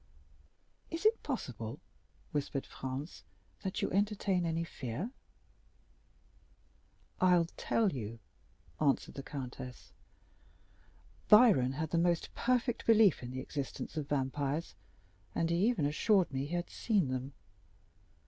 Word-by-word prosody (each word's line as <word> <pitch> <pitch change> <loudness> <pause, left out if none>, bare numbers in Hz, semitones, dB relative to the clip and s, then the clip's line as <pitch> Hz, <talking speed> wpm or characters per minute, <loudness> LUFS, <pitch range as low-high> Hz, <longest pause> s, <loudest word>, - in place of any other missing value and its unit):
"Is 330 +5 -5
it 445 +1 +4
possible," - - -4 0.5
whispered 145 -3 -2
Franz, 135 +5 -6 0.4
"that 190 - -3
you - - 0
entertain 200 -3 +1
any 165 0 0
fear?" 155 - -5 2.1
"I'll 180 -2 +5
tell 220 -4 +1
you," 115 -5 -5 0.6
answered 145 -3 +1
the 135 - -6
countess. 130 -2 -7 1.4
"Byron 210 - +7
had 155 +2 -3
the 170 - +2
most 170 -1 +1
perfect 245 -1 0
belief 220 -5 +6
in 120 - -6
the 130 +1 -4
existence 140 +1 -5
of 150 -3 -3
vampires, 140 +3 -1 0.6
and 165 0 +1
even 185 -1 +2
assured 180 +4 +3
me 135 +1 -1
that - - -8
he 175 - -2
had 175 0 -2
seen 200 - +1
them. 130 +2 -3
165 Hz, 120 wpm, -33 LUFS, 135-200 Hz, 2.1 s, Byron